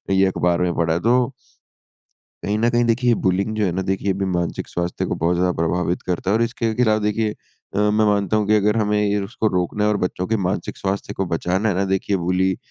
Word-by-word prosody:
ये 95 Hz, 0 st, +4 dB
अखबार 90 Hz, -2 st, +1 dB
में 90 Hz, -1 st, +1 dB
पढ़ा 80 Hz, -1 st, +1 dB
है 85 Hz, -, 0 dB
तो 125 Hz, +4 st, +2 dB, 1.1 s
कहीं 105 Hz, +1 st, 0 dB
न 115 Hz, +1 st, +3 dB
कहीं 120 Hz, 0 st, +2 dB
देखिए 120 Hz, +1 st, +2 dB
बुलिंग 95 Hz, +3 st, +1 dB
जो 105 Hz, -, +1 dB
है 90 Hz, -, 0 dB
ना, 95 Hz, +2 st, -2 dB
देखिए 95 Hz, +1 st, -1 dB
अभी 95 Hz, +1 st, -2 dB
मानसिक 85 Hz, -2 st, -2 dB
स्वास्थ्य 85 Hz, 0 st, -3 dB
को -, -, -2 dB
बहुत 85 Hz, +2 st, +1 dB
ज़्यादा 90 Hz, +1 st, +2 dB
प्रभावित 90 Hz, +1 st, 0 dB
करता 90 Hz, +1 st, -2 dB
है -, -, +3 dB
और -, -, 0 dB
इसके 115 Hz, -1 st, -1 dB
खिलाफ 110 Hz, -3 st, +2 dB
देखिए, 105 Hz, +1 st, 0 dB, 0.5 s
अ, -, -, -1 dB
मैं 105 Hz, +1 st, +3 dB
मानता 105 Hz, +1 st, +2 dB
हूँ 105 Hz, -1 st, 0 dB
कि 110 Hz, -, +4 dB
अगर 105 Hz, +1 st, +2 dB
हमें 105 Hz, -1 st, +1 dB
ये 105 Hz, 0 st, +1 dB
उसको 110 Hz, +3 st, -2 dB
रोकना 90 Hz, +4 st, -1 dB
है 105 Hz, -, +3 dB
और 105 Hz, -, +1 dB
बच्चों 90 Hz, 0 st, -3 dB
के 110 Hz, 0 st, +1 dB
मानसिक 100 Hz, -, -3 dB
स्वास्थ्य 100 Hz, +1 st, -3 dB
को 95 Hz, -, -2 dB
बचाना 95 Hz, +6 st, 0 dB
है 95 Hz, -, 0 dB
ना 95 Hz, +1 st, +1 dB
देखिए, 95 Hz, +1 st, 0 dB
बुली 90 Hz, +1 st, 0 dB
100 Hz, 235 wpm, -21 LUFS, 90-110 Hz, 1.1 s, ये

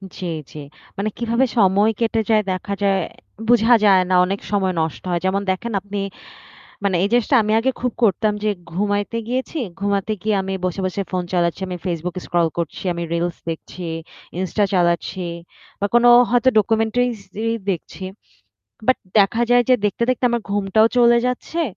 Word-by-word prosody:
জ্বী, 185 Hz, -, -5 dB, 0.2 s
জ্বী। 150 Hz, -, -8 dB, 0.3 s
মানে 205 Hz, +2 st, -1 dB
কিভাবে 235 Hz, +2 st, +1 dB
সময় 200 Hz, +1 st, +4 dB
কেটে 225 Hz, -1 st, +1 dB
যায় 215 Hz, -1 st, +4 dB
দেখা 185 Hz, +2 st, -3 dB
যায় 195 Hz, -1 st, +3 dB, 0.5 s
বুঝা 240 Hz, 0 st, +5 dB
যায় 190 Hz, -2 st, +6 dB
না। 185 Hz, -, +3 dB
অনেক 195 Hz, +2 st, -2 dB
সময় 190 Hz, -2 st, +1 dB
নষ্ট 160 Hz, -1 st, -3 dB
হয়। 175 Hz, -1 st, 0 dB
যেমন 195 Hz, +1 st, +1 dB
দেখেন 230 Hz, +5 st, -4 dB
আপনি 205 Hz, +1 st, -5 dB, 0.8 s
মানে 195 Hz, -2 st, +1 dB
এই -, -, +3 dB
জিনিসটা 245 Hz, +3 st, +3 dB
আমি 215 Hz, -, -1 dB
আগে 265 Hz, +3 st, +1 dB
খুব 250 Hz, 0 st, 0 dB
করতাম 215 Hz, 0 st, +2 dB
যে 215 Hz, -, +2 dB, 0.2 s
ঘুমাইতে 205 Hz, +4 st, -1 dB
গিয়েছি। 260 Hz, +6 st, -2 dB, 0.2 s
ঘুমাতে 200 Hz, +1 st, -1 dB
গিয়ে 215 Hz, +1 st, +1 dB
আমি 195 Hz, 0 st, -4 dB
বসে, 185 Hz, +1 st, -2 dB
বসে 185 Hz, +2 st, -2 dB
ফোন 185 Hz, -1 st, -1 dB
চালাচ্ছি। 175 Hz, +1 st, 0 dB
আমি 180 Hz, -1 st, -4 dB
Facebook 175 Hz, -1 st, -3 dB
স্ক্রল 175 Hz, -1 st, +1 dB
করছি, 170 Hz, -3 st, -4 dB
আমি 170 Hz, 0 st, -4 dB
রিলস 170 Hz, 0 st, -1 dB
দেখছি, 170 Hz, +2 st, -6 dB, 0.5 s
ইনস্টা 190 Hz, +3 st, 0 dB
চালাচ্ছি 175 Hz, 0 st, +1 dB, 0.6 s
বা 200 Hz, -, 0 dB
কোন 240 Hz, 0 st, +5 dB, 0.3 s
হয়তো 245 Hz, +1 st, +4 dB
ডকুমেন্টারিস 225 Hz, +2 st, +1 dB, 0.3 s
ই -, -, +2 dB, 0.2 s
দেখছি। 185 Hz, 0 st, -4 dB, 0.8 s
বাট 255 Hz, -, +4 dB, 0.2 s
দেখা 205 Hz, +4 st, +3 dB
যায় 245 Hz, 0 st, +5 dB
যে -, -, +7 dB
দেখতে, 210 Hz, +3 st, 0 dB
দেখতে 255 Hz, 0 st, +1 dB
আমার 235 Hz, -1 st, 0 dB
ঘুমটাও 205 Hz, +2 st, +3 dB
চলে 240 Hz, -1 st, +6 dB
যাচ্ছে। 250 Hz, +7 st, -3 dB
205 Hz, 170 wpm, -20 LUFS, 185-230 Hz, 0.8 s, যে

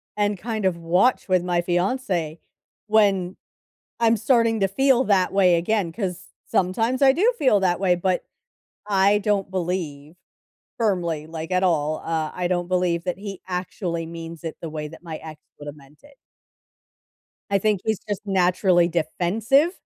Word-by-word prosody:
and 205 Hz, -1 st, 0 dB
kind 215 Hz, +1 st, -4 dB
of 180 Hz, -2 st, +1 dB
watch 180 Hz, +9 st, +2 dB
with 185 Hz, -2 st, +2 dB
my 175 Hz, -1 st, 0 dB
fiance 175 Hz, -3 st, -1 dB, 0.5 s
when 200 Hz, -4 st, +2 dB, 0.6 s
I'm 230 Hz, -1 st, +3 dB
starting 230 Hz, -1 st, +2 dB
to 195 Hz, -, +2 dB
feel 260 Hz, +5 st, +2 dB
that 190 Hz, -3 st, +2 dB
way 185 Hz, -3 st, +4 dB
again, 175 Hz, +1 st, 0 dB
'cause 190 Hz, -3 st, -4 dB, 0.2 s
sometimes 225 Hz, +8 st, 0 dB
I 270 Hz, -1 st, +6 dB
do 420 Hz, -, +3 dB
feel 260 Hz, -9 st, +4 dB
that 180 Hz, -1 st, +1 dB
way, 180 Hz, -2 st, +3 dB
but 185 Hz, +1 st, -1 dB, 0.6 s
I 200 Hz, +1 st, +4 dB
don't 200 Hz, -2 st, -1 dB
believe 170 Hz, -4 st, -4 dB, 0.6 s
firmly, 175 Hz, -9 st, -1 dB
like, 160 Hz, +1 st, -7 dB
at 185 Hz, +1 st, +2 dB
all, 155 Hz, -4 st, +1 dB
uh, 160 Hz, -2 st, -2 dB
I 180 Hz, -1 st, -2 dB
don't 175 Hz, -1 st, -1 dB
believe 180 Hz, -2 st, 0 dB
that 180 Hz, -1 st, -2 dB
he 195 Hz, -1 st, -8 dB
actually 180 Hz, -2 st, -3 dB
means 165 Hz, 0 st, -9 dB
it 160 Hz, -, -5 dB
the 165 Hz, -, -5 dB
way 150 Hz, -1 st, -5 dB
that 165 Hz, +3 st, -13 dB
my 160 Hz, -2 st, -6 dB
ex 155 Hz, -1 st, -11 dB, 0.2 s
would 145 Hz, -, -9 dB
have 145 Hz, -, -7 dB
meant 145 Hz, 0 st, -20 dB
it. 285 Hz, -1 st, -19 dB, 1.3 s
I 200 Hz, -, +3 dB
think 205 Hz, -1 st, 0 dB
he's 220 Hz, -3 st, -1 dB
just 205 Hz, -2 st, -3 dB
naturally 180 Hz, -2 st, +3 dB
defensive, 190 Hz, -, +1 dB
185 Hz, 165 wpm, -23 LUFS, 170-210 Hz, 1.3 s, I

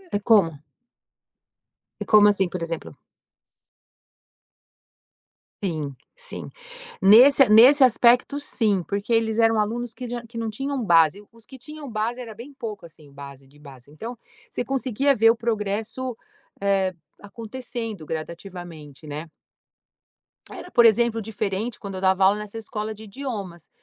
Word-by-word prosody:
É -, -, +1 dB
como? 200 Hz, -7 st, +5 dB, 1.5 s
É -, -, -3 dB
como 210 Hz, -1 st, +6 dB
assim, 195 Hz, -2 st, +1 dB
por 180 Hz, -, -6 dB
exemplo? 165 Hz, -1 st, -6 dB, 2.7 s
Sim, 155 Hz, -7 st, -3 dB, 0.2 s
sim. -, -, -8 dB, 0.5 s
Nesse 245 Hz, +6 st, +7 dB
nesse 255 Hz, +6 st, +7 dB
aspecto, 250 Hz, +3 st, +4 dB
sim, 215 Hz, -9 st, 0 dB
porque 200 Hz, +3 st, -4 dB
eles 225 Hz, -1 st, +1 dB
eram 225 Hz, -1 st, +3 dB
alunos 230 Hz, +2 st, -2 dB
que 250 Hz, +1 st, -7 dB
já 240 Hz, 0 st, -6 dB
que 230 Hz, +1 st, -11 dB
não 225 Hz, -1 st, -2 dB
tinham 270 Hz, +4 st, -4 dB
base. 165 Hz, -1 st, +3 dB
Os 230 Hz, -1 st, -16 dB
que 265 Hz, -, -13 dB
tinham 290 Hz, +3 st, -10 dB
base 230 Hz, +3 st, -2 dB
era 230 Hz, -3 st, -8 dB
bem 240 Hz, +7 st, -11 dB
pouco, 225 Hz, -8 st, -7 dB
assim, 155 Hz, -3 st, -16 dB
base 140 Hz, -1 st, -12 dB
de 140 Hz, +2 st, -22 dB
base. 140 Hz, -2 st, -15 dB
Então 230 Hz, +10 st, -8 dB, 0.3 s
você -, -, -3 dB
conseguia 270 Hz, +1 st, 0 dB
ver 225 Hz, -2 st, +5 dB
o -, -, -1 dB
progresso, 225 Hz, +2 st, -3 dB, 0.5 s
eh, 195 Hz, -2 st, +1 dB, 0.3 s
acontecendo 225 Hz, -2 st, -7 dB
gradativamente, 160 Hz, -3 st, -8 dB
né 150 Hz, +2 st, -7 dB, 1.2 s
era, 360 Hz, -, -10 dB
por 235 Hz, -, +5 dB
exemplo, 230 Hz, 0 st, +3 dB
diferente 215 Hz, +1 st, -4 dB
quando 200 Hz, -2 st, -7 dB
eu 185 Hz, -, -6 dB
dava 190 Hz, 0 st, +2 dB
aula 200 Hz, +2 st, +4 dB
nessa 210 Hz, +1 st, -8 dB
escola 215 Hz, -1 st, -5 dB
de 215 Hz, -, -13 dB
idiomas, 200 Hz, -, -7 dB
215 Hz, 140 wpm, -23 LUFS, 190-240 Hz, 2.7 s, Nesse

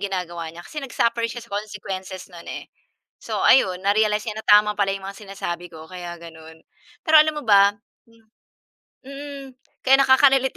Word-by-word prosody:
ginagawa 175 Hz, -4 st, -4 dB
niya 170 Hz, +2 st, -11 dB
kasi 300 Hz, -, -7 dB
nag-suffer 235 Hz, -3 st, -1 dB
siya 235 Hz, 0 st, -8 dB
sa 220 Hz, -, -20 dB
consequences 195 Hz, -3 st, -6 dB
'non, 170 Hz, -1 st, -12 dB
eh. -, -, -8 dB, 0.5 s
So, -, -, -5 dB
ayun 185 Hz, -8 st, +4 dB
na-realize 210 Hz, +1 st, +2 dB
niya 215 Hz, 0 st, -5 dB
na -, -, -20 dB
tama 210 Hz, 0 st, +6 dB
pala 195 Hz, -1 st, +1 dB
yung 195 Hz, -, -11 dB
mga 195 Hz, -, -9 dB
sinasabi 175 Hz, -3 st, -5 dB
ko, 160 Hz, -1 st, -11 dB
kaya 175 Hz, -1 st, -8 dB
gano'n. 160 Hz, -1 st, -13 dB, 0.4 s
Pero 315 Hz, -2 st, +7 dB
alam 310 Hz, 0 st, +1 dB
mo 300 Hz, -, -5 dB
ba? 200 Hz, -2 st, +5 dB, 0.4 s
Hmm, 230 Hz, -1 st, -24 dB, 0.8 s
mm, 280 Hz, 0 st, -8 dB, 0.4 s
kaya 270 Hz, +1 st, +6 dB
nakaka-relate 265 Hz, 0 st, +4 dB
205 Hz, 170 wpm, -22 LUFS, 180-255 Hz, 0.8 s, Pero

